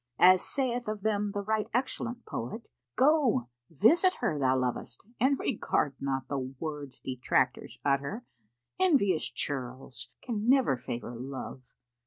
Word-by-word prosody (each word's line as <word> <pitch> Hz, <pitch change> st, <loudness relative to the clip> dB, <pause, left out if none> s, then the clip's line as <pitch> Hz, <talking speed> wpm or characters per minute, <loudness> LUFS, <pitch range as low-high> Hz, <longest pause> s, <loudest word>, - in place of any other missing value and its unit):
As 185 Hz, 0 st, +7 dB
saith 245 Hz, -4 st, -1 dB
of 215 Hz, -2 st, -3 dB
them 210 Hz, -1 st, +1 dB
the 200 Hz, 0 st, -3 dB
right 215 Hz, +1 st, 0 dB
excellent 245 Hz, -1 st, -2 dB
poet,[FN#483] 125 Hz, -, -5 dB, 0.3 s
"Go, 260 Hz, -, +3 dB, 0.2 s
visit 330 Hz, -, +4 dB
her 150 Hz, -, 0 dB
thou 130 Hz, -1 st, +3 dB
lovest, 125 Hz, +1 st, -3 dB
and 270 Hz, +3 st, +3 dB
regard 175 Hz, -, 0 dB
not 135 Hz, -1 st, -2 dB
The 140 Hz, -, -2 dB
words 135 Hz, +2 st, -6 dB
detractors 130 Hz, -1 st, 0 dB
utter; 140 Hz, -, 0 dB, 0.5 s
envious 255 Hz, -, +3 dB
churls 130 Hz, -2 st, -4 dB
Can 225 Hz, -1 st, -2 dB
never 260 Hz, -, +5 dB
favour 120 Hz, 0 st, -6 dB
love. 130 Hz, 0 st, -7 dB
185 Hz, 130 wpm, -30 LUFS, -, 0.5 s, As